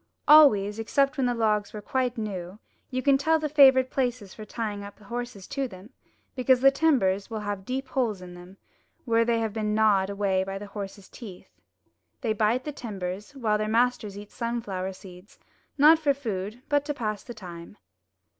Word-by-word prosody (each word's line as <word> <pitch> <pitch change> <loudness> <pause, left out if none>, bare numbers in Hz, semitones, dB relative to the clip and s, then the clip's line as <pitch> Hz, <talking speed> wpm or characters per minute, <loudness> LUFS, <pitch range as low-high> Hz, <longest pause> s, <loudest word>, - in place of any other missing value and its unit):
Always, 220 -9 +6
except 275 +5 +1
when 260 -2 +1
the 245 - 0
logs 215 -2 0
are 210 - -6
quite 255 0 -1
new, 195 -4 -5 0.3
you 255 -1 -3
can 275 -1 +4
tell 320 +3 +3
the 310 -1 -2
favourite 265 -3 +5
places 245 -7 -2
for 215 - -9
tying 210 -2 -4
up 200 0 -10
horses 235 -1 -7
to 275 -1 -2
them, 195 +2 -13 0.4
because 255 -1 +3
the 270 +2 +6
timbers 245 -11 +1
will 220 -2 -4
have 205 -2 -4
deep 265 +1 -3
holes 235 -7 -1
in 180 -1 -10
them, 180 +2 -13 0.5
where 230 -2 +3
they 230 0 +1
have 220 -2 -2
been 210 -1 -1
gnawed 205 -3 +3
away 200 -2 0
by 195 0 -5
the 205 - -7
horses' 200 -1 -8
teeth. 200 -7 -12 0.7
They 225 -5 0
bite 220 +4 +1
the 300 - -4
timbers, 205 -1 -6
while 215 -5 0
their 215 - -1
masters 225 -3 0
eat 205 0 -10
sunflower 205 -6 -3
seeds, 185 +1 -14 0.4
not 310 +3 +7
for 285 -3 +2
food, 220 -2 -5
but 290 -1 +2
to 295 -1 -3
pass 215 -5 -3
the 240 - -10
time. 175 -1 -10
220 Hz, 185 wpm, -26 LUFS, 200-255 Hz, 0.7 s, not